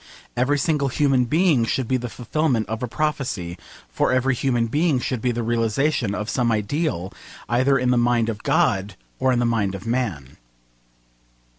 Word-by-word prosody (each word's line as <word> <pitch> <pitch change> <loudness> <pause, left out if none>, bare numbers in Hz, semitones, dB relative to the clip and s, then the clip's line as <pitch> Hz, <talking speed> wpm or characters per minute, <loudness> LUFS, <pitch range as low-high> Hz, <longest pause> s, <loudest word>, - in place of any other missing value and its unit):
Every 130 +4 +2
single 145 -1 +1
human 135 -2 +2
being 155 -1 +3
should 120 +2 -1
be 130 - +1
the 125 -1 -5
fulfilment 120 +2 -1
of 110 0 -4
a 125 - -2
prophecy: 125 - -2 0.3
for - - 0
every 130 +1 +2
human 120 -2 0
being 150 +5 +1
should 125 -1 -3
be 125 - +1
the 120 0 -2
realisation 115 +1 0
of 105 0 -4
some 120 0 +1
ideal, 110 - -1 0.3
either 130 +3 +3
in 125 -1 +1
the 125 - +3
mind 120 -1 +2
of 105 -3 -4
God 105 - +1 0.2
or 130 - +2
in 125 - +2
the 120 - +1
mind 105 -5 0
of 100 +2 -9
man. 110 - -3
120 Hz, 175 wpm, -22 LUFS, 110-135 Hz, 0.3 s, being